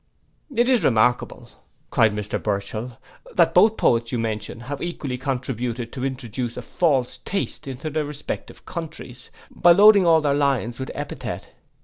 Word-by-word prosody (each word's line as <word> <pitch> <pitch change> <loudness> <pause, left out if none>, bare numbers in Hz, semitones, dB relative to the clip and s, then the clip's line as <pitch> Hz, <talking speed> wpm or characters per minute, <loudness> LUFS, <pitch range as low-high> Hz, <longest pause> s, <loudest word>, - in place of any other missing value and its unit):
'—'It 240 -2 +2
is 250 -7 +3
remarkable,' 120 -1 +1 0.4
cried 110 -1 +4
Mr 105 0 -3
Burchell, 110 +4 -3 0.4
'that - - +4
both 220 0 +6
the - - -10
poets 115 0 +3
you 125 - -1
mention 115 0 -3
have 140 +3 -6
equally 155 -7 -4
contributed 125 -3 -3
to 130 - -5
introduce 125 -2 -4
a - - -5
false 140 -8 0
taste 195 -6 -4
into 135 +4 -5
their 155 +1 0
respective 145 0 -7
countries, 155 -8 -8 0.2
by 175 - +5
loading 200 0 +7
all 165 -1 +6
their 145 -2 +1
lines 135 -4 0
with 130 - -4
epithet. 130 -9 -6
130 Hz, 155 wpm, -23 LUFS, 115-155 Hz, 0.4 s, loading